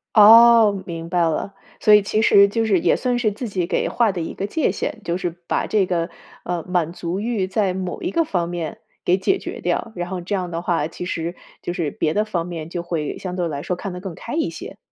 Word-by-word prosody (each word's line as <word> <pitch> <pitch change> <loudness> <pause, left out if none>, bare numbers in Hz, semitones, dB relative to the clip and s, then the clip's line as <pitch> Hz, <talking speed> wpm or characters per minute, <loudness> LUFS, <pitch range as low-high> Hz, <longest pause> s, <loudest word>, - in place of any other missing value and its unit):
哦， 220 -2 +8
明 165 -1 -6
白 175 0 +1
了。 165 +4 0 0.3
所 210 - +5
以 210 - +8
其 215 +2 0
实 200 -2 +6
就 225 +3 0
是 200 -5 +3
也 - - +3
算 250 -1 0
是 230 -3 +1
自 215 +3 -5
己 185 -3 -1
给 - - 0
划 230 -4 +2
的 180 - -4
一 165 - -4
个 195 - -3
界 310 +7 0
限， 220 - -4
就 170 +1 -1
是 175 -1 -2 0.2
把 - - 0
这 210 -3 +2
个， 170 -1 -1 0.4
呃， 175 -2 -2
满 175 -2 0
足 175 +1 -4
欲 215 -3 -1
在 195 -1 0
某 185 -1 -4
一 350 - -1
个 335 - +2
方 180 - -1
面 170 -3 -4 0.3
给 180 - +3
解 380 - +1
决 - - -7
掉。 230 - -1
然 175 0 -4
后 185 -1 -4
这 190 +4 -2
样 180 -2 -3
的 165 0 -3
话， 165 -4 0
其 180 - -7
实 170 -1 -3 0.3
就 175 - -3
是 170 -4 -1
别 155 - -1
的 210 - +2
方 175 -6 -2
面 165 -3 -6
就 170 0 -4
会 165 -4 -3
相 180 -1 -5
对 180 -2 -1
来 145 -3 -4
说 180 - -2
看 195 +2 -6
得 180 - -6
更 190 -2 -6
开 235 - -8
一 325 - 0
些。 - - -9
185 Hz, 270 characters per minute, -21 LUFS, 170-210 Hz, 0.4 s, 哦